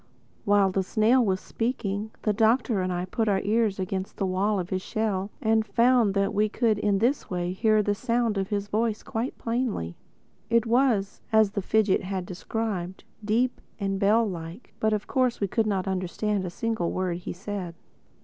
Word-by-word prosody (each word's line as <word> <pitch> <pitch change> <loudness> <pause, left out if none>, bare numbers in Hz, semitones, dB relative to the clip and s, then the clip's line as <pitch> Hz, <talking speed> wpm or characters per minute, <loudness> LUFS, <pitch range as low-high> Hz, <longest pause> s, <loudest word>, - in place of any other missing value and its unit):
While 200 -2 +4
the 195 - +1
snail 220 +6 +3
was 190 -3 +1
speaking, 215 -3 -3
the 210 - +2
Doctor 225 -1 +2
and 185 0 -1
I 180 0 -2
put 220 +4 -1
our 195 -1 +2
ears 215 -1 +1
against 190 0 -3
the 195 - 0
wall 195 +2 +1
of 180 0 -5
his 185 0 -1
shell 205 -2 -2
and 220 0 +3
found 230 0 +3
that 200 0 +1
we 210 +1 +2
could 220 -1 +1
in 205 -1 +2
this 245 +7 0
way 180 -1 -2
hear 215 +2 +3
the 205 - +1
sound 230 +1 0
of 195 - -1
his 205 -1 -2
voice 215 +1 -1
quite 230 +4 -3
plainly. 230 - -2 0.5
It 230 0 +3
was, 230 -4 +1
as 220 -2 +4
the 200 - -2
fidgit 210 0 +2
had 190 -1 -4
described, 190 0 -4 0.2
deep 235 +4 0 0.2
and 195 -1 -1
bell 215 +3 +4
like. 170 +3 -8
But 220 - +2
of 210 -1 -1
course 255 -2 +1
we 200 - 0
could 220 +3 0
not 195 -2 -1
understand 190 +2 -1
a - - -3
single 220 -1 -2
word 185 -2 -1
he 180 - -6
said. 185 -2 -5
205 Hz, 190 wpm, -26 LUFS, 190-225 Hz, 0.5 s, While